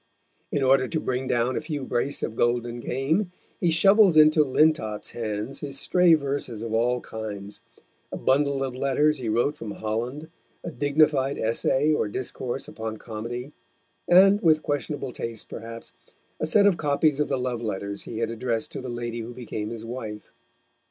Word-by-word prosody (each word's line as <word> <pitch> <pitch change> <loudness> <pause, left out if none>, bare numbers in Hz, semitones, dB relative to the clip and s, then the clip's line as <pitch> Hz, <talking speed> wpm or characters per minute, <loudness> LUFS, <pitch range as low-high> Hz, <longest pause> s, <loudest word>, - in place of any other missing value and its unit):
In 145 - 0
order 130 0 +4
to 160 - -2
bring 130 -2 -2
down 120 +1 +1
a - - -1
few 145 -5 -4
brace 130 +4 -1
of 110 - -3
golden 120 0 0
game, 155 - -1 0.3
he 175 - +2
shovels 195 +1 +5
into 155 0 +7
Lintott's 130 -7 +1
hands 110 +3 -4
his 140 -2 -5
stray 180 0 +5
verses 140 -6 -3
of 115 -1 -4
all 120 +2 +1
kinds, 105 -2 -7 0.5
a - - -4
bundle 140 0 +1
of 130 -2 -3
letters 140 +3 +1
he 120 -3 -3
wrote 120 +7 +1
from 115 -7 -7
Holland, 120 +8 -4 0.4
a 170 - -5
dignified 145 -2 +2
essay 130 +6 +1
or 150 - 0
discourse 125 +3 -4
upon 110 -1 -6
Comedy, 120 +5 -6 0.6
and, 195 +3 +6
with 155 -2 +4
questionable 145 -2 -3
taste 115 -2 -5
perhaps, 115 +1 -8 0.5
a 155 - -1
set 200 +6 +4
of 200 -4 +4
copies 145 0 +1
of 150 - +1
the 135 - -1
love 125 -2 -2
letters 100 -2 -3
he 115 - -6
had 115 0 -1
addressed 115 -1 -2
to - - -5
the 130 - -6
lady 120 -1 -4
who 115 +1 -7
became 110 -3 -5
his 115 -1 -7
wife. 110 -3 -7
130 Hz, 170 wpm, -25 LUFS, 115-150 Hz, 0.6 s, into